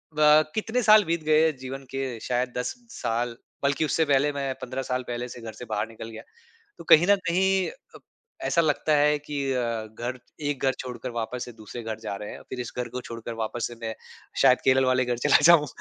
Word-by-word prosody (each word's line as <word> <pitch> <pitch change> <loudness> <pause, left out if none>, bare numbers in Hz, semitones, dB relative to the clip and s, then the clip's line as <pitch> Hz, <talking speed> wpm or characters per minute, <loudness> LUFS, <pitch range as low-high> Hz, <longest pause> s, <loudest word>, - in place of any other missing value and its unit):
ब 150 0 +6
कितने 225 +3 0
साल 215 0 +7
बीत 165 -1 -1
गए 155 +1 +4
हैं 160 -2 +1
जीवन 130 +1 -7
के 135 -3 -3
शायद 125 0 -1
10 125 - -2 0.2
साल 120 - -2 0.3
बल्कि 140 +3 +2
उससे 160 +1 +1
पहले 145 0 +3
मैं 140 -1 -2
15 130 +1 -4
साल 125 0 -2
पहले 120 0 -3
से 120 - -9
घर 115 -1 -7
से 125 - -9
बाहर 105 -2 -2
निकल 115 0 -9
गया। 110 - -9 0.6
तो - - -10
कहीं 165 +3 +7
न 205 - +7
कहीं 190 +2 +2 0.3
अ, - - -12 0.5
ऐसा 170 - +3
लगता 155 -1 +1
है 150 +1 +3
कि 145 -1 -4
अ, 115 -3 -1
घर 120 +4 -5 0.3
एक 145 -2 -3
घर 135 - +4
छोड़कर 125 0 -6
वापस 120 +1 -4
से 120 - -10
दूसरे 115 +2 -9
घर 110 -1 -5
जा 110 -3 -4
रहे 105 - -6
हैं - - -8
और - - -15
फिर 130 - -4
इस 120 - -5
घर 125 -1 -2
को - - -2
छोड़कर 115 -1 -7
वापस 115 +1 -3
से 120 - -9
मैं 110 -1 -3 0.5
शायद - - +6
केरल 130 0 +4
वाले 130 0 +3
घर 120 -1 -2
चला - - +7
जाऊँ। 160 -1 +7
130 Hz, 230 wpm, -26 LUFS, 120-150 Hz, 0.6 s, साल